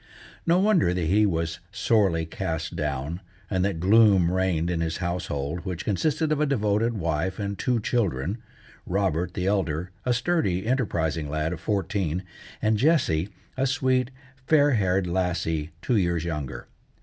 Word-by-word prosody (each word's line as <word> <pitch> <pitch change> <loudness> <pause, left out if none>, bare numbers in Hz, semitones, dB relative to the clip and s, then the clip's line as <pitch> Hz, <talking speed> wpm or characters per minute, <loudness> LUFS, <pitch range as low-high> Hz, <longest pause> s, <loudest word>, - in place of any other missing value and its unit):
No 170 +1 +5
wonder 185 - +3
that 90 -2 -1
he 105 +6 +4
was 80 -3 -2
sorely 100 -6 +2
cast 80 -1 -4
down, 75 +2 -3 0.3
and 95 -2 +1
that 95 -4 -1
gloom 100 -2 +5
reigned 90 -2 +1
in 85 -2 -1
his 80 -1 -1
household, 85 -3 -3
which 90 -1 -5
consisted 155 - 0
of 150 -1 +1
a 150 - +3
devoted 115 -2 +1
wife 85 0 -1
and 100 -1 -3
two 125 +2 0
children—Robert, 95 - -2
the 90 - -2
elder, 90 -3 0
a 125 - 0
sturdy, 120 - 0
enterprising 85 - 0
lad 75 +3 -1
of - - -6
fourteen, 95 -4 -1 0.4
and 110 0 +3
Jessie, 105 - +2 0.3
a 135 +1 +1
sweet, 130 -3 +1 0.4
fair 145 -2 +5
haired 95 -5 +2
lassie 85 -3 -1
two 120 - +2
years 85 -4 +1
younger. 70 -7 -4
95 Hz, 150 wpm, -26 LUFS, 85-115 Hz, 0.4 s, No